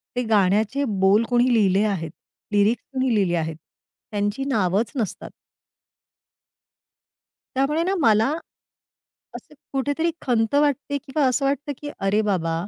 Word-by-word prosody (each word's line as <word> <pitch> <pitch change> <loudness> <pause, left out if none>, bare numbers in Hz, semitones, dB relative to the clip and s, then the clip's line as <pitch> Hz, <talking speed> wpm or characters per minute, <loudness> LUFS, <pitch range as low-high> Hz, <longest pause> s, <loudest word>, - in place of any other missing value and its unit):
ते 250 - 0
गाण्याचे 210 +6 +2
बोल 200 +2 +3
कुणी 245 +1 +3
लिहिले 200 -2 +3
आहेत? 175 -7 -2 0.4
लिरिक्स 210 +3 +2
कोणी 260 -2 +1
लिहिले 185 -4 +1
आहेत? 160 -1 -3 0.6
त्यांची 205 +5 -1
नावच 205 -4 0
नसतात. 225 -7 -4 2.2
त्यामुळे 300 +5 +1
ना 380 +2 0
मला 225 -2 +4 1.1
असं - - -11 0.2
कुठेतरी 285 +5 0
खंत 230 0 0
वाटते 285 -1 +1
किंवा 275 +2 -1
असं 265 +2 0
वाटतं 285 +1 -1
की 295 - -7 0.2
अरे 205 +2 +2
बाबा 165 -5 0
225 Hz, 125 wpm, -23 LUFS, 200-275 Hz, 2.2 s, मला